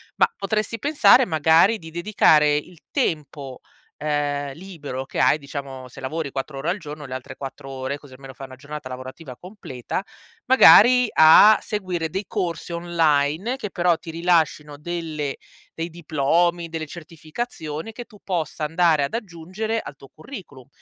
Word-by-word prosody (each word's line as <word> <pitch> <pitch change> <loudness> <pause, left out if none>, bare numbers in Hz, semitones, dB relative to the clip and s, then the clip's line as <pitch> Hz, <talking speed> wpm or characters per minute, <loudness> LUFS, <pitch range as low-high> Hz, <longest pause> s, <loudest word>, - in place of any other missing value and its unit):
ma 465 - +2
potresti 215 +2 -2
pensare, 285 -2 +5
magari, 165 +5 +4
di 160 -3 -12
dedicare 160 -5 +3
il 165 +2 -5
tempo, 150 - -3 0.4
ehm, 145 -2 -2
libero 150 -7 -7
che - - -6
hai, 150 - +4
diciamo, 135 -2 -8
se - - -13
lavori 140 +1 -4
4 135 +1 -5
ore 160 +5 -2
al 190 - 0
giorno 150 -2 -9
le 130 - -8
altre 130 -1 -7
4 135 0 -8
ore, 135 +1 -4
così 140 -3 -16
almeno 135 0 -11
fai 135 +1 -9
una 130 - -12
giornata 150 0 -8
lavorativa 130 +2 -9
completa, 180 - -6 0.4
magari 250 -1 +7
a 160 +7 +8
seguire 185 -6 -3
dei 190 +5 -3
corsi 175 -5 -3
online 170 - 0
che 210 -6 -5
però 175 -1 +2
ti 165 - -12
rilascino 160 -3 0
delle 155 -3 -4 0.5
dei 165 - -2
diplomi, 170 +1 0
delle 160 -1 -4
certificazioni, 160 +2 -7
che 240 +2 -8
tu 210 - -18
possa 165 -4 -3
andare 165 -1 +2
ad 140 - -3
aggiungere 210 +3 -4
al 145 - -9
tuo 135 -1 -16
curriculum, 155 - -11
160 Hz, 155 wpm, -22 LUFS, 145-180 Hz, 0.5 s, a